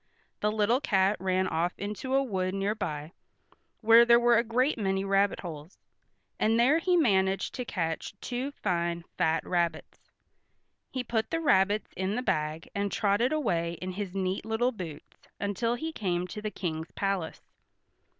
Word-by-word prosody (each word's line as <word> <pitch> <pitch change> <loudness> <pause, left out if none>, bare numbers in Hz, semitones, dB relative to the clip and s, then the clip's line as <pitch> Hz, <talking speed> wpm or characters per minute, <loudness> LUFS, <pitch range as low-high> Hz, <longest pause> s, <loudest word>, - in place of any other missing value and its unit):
The 210 - +1
little 220 +5 +2
cat 195 -4 +2
ran 185 0 +1
off 170 +2 0
into 210 +6 -3
a 275 - +4
wood 190 -6 -2
near 195 +2 0
by, 155 -6 -4 0.7
where 230 +1 +8
there 235 0 +6
were 240 0 +4
a - - +1
great 250 +5 +1
many 195 -3 -1
rabbit 195 0 +2
holes, 160 -1 -8 0.6
and 225 +1 +3
there 275 +7 +5
he 355 +1 +2
managed 195 - +2
to 250 - -4
catch 165 -2 -3
two 250 +2 -3
fine 170 -2 0 0.2
fat 160 0 +1
rabbits. 175 -2 -2 0.8
He 260 -1 -3
put 225 -2 -1
the 330 - -1
rabbits 205 -8 +2
in 190 +2 -1
the 250 - -2
bag 155 -4 -1
and 200 0 -1
trotted 210 +4 +2
away 170 - 0
in 185 +2 -5
his 195 0 -5
neat 190 0 -1
little 225 +3 0
boots 170 - -10
until 215 +4 -1
he 320 +6 -4
came 180 - -1
to 210 - -6
the 215 - -2
King's 160 -5 -4
palace. 195 -5 -2
200 Hz, 165 wpm, -29 LUFS, 180-235 Hz, 0.8 s, where